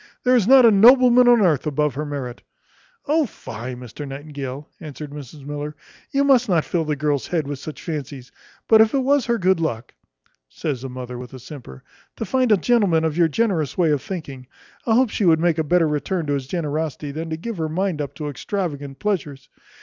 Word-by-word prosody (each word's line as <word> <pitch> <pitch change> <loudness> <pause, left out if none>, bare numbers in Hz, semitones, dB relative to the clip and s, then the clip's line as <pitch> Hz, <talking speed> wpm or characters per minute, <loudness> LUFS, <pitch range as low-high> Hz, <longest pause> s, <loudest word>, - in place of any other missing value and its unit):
There 255 0 +4
is 220 -5 +2
not 260 -1 +8
a 230 - +7
nobleman 245 +3 +6
upon 240 -2 +6
earth 155 -5 +1
above 150 0 0
her 150 +2 -4
merit." 130 -4 -5 0.6
"O 305 -1 +2
fie! 120 - -8
Mr 125 +4 -9
Nightingale," 140 0 -7
answered 150 -3 -8
Mrs 145 -1 -10
Miller, 145 +1 -5 0.3
"you 280 0 +1
must 260 -5 +3
not 170 -4 +2
fill 165 -2 -1
the 150 -1 -1
girl's 145 -1 -1
head 165 -4 -1
with 140 -1 -5
such 155 +2 -8
fancies: 140 -5 -6 0.4
but 220 -1 +7
if 220 +4 +3
it 270 - +1
was 280 -1 +2
her 235 0 +1
good 185 -3 +2
luck" 120 -9 -3 0.6
(says 140 -6 -4
the 135 - -6
mother 125 -1 -7
with 125 +1 -9
a - - -9
simper) 125 - -11 0.3
"to 225 - -4
find 255 +2 +1
a 210 - +6
gentleman 195 -8 +2
of 160 -2 -1
your 170 -1 +4
generous 160 - -1
way 170 -4 +3
of 145 -3 +1
thinking, 140 -9 -7 0.4
I 225 - +3
hope 250 -2 +3
she - - -2
would 160 -2 +5
make 170 -1 +1
a - - +2
better 165 +2 +2
return 155 +3 -2
to 145 - -1
his 135 -2 -3
generosity 155 -2 -3
than 160 +3 -5
to 160 - -3
give 225 +5 -6
her 160 -1 -1
mind 180 -1 -1
up 140 -1 -6
to 150 - -5
extravagant 145 -3 -4
pleasures. 150 -8 -3
155 Hz, 210 wpm, -22 LUFS, 140-200 Hz, 0.6 s, not